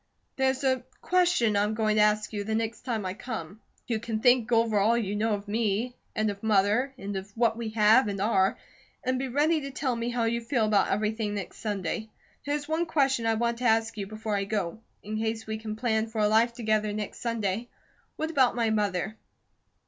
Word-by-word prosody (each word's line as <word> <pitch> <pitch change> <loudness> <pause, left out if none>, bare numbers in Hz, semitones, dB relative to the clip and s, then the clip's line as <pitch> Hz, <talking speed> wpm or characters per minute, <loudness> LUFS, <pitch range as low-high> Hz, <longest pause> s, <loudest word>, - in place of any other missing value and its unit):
There's 265 0 +1
a 260 -2 +2 0.2
question 355 - +2
I'm 210 +2 +1
going 215 -1 +1
to - - +5
ask 210 +1 +2
you 205 -1 -2
the 220 +1 -2
next 225 0 -2
time 230 -5 -3
I 185 - -2
come. 215 -3 -7 0.2
You 230 -3 -1
can 225 -1 -3
think 245 0 +4
over 225 -2 +3
all 225 +4 +3
you 205 -3 -1
know 215 +1 +1
of 200 0 -8
me, 220 +3 -1 0.2
and 215 -1 +1
of 200 0 -10
Mother, 215 +5 +2
and 200 -4 -5
of 190 +1 -5
what 230 -1 +3
we 230 -1 -4
have, 215 +3 +6
and 200 -1 -3
are, 195 -1 +2 0.5
and 255 0 0
be 265 - -2
ready 300 +5 +2
to 275 - -5
tell 265 -2 -1
me 230 +1 -2
how 240 -1 -1
you 235 +1 0
feel 230 -1 +1
about 205 -2 +3
everything 210 +1 -1
next 200 -3 -6
Sunday. 210 +1 -3 0.4
There's 290 0 -1
one 320 +2 0
question 270 -7 +1
I 225 - +3
want 235 +1 0
to 250 - -3
ask 225 0 +2
you 200 -2 -4
before 215 0 -3
I 200 0 0
go. 200 -2 -2 0.2
In 215 +1 -4
case 225 0 -2
we 220 0 -4
can 215 -1 -5
plan 220 -1 0
for 220 0 -5
a 210 - +4
life 225 +3 +3
together 215 -3 0
next 210 -1 -5
Sunday, 230 -1 -2 0.5
what 315 +1 -3
about 260 -7 +3
my 230 -2 +1
mother?" 210 0 -1
220 Hz, 215 wpm, -28 LUFS, 210-240 Hz, 0.5 s, have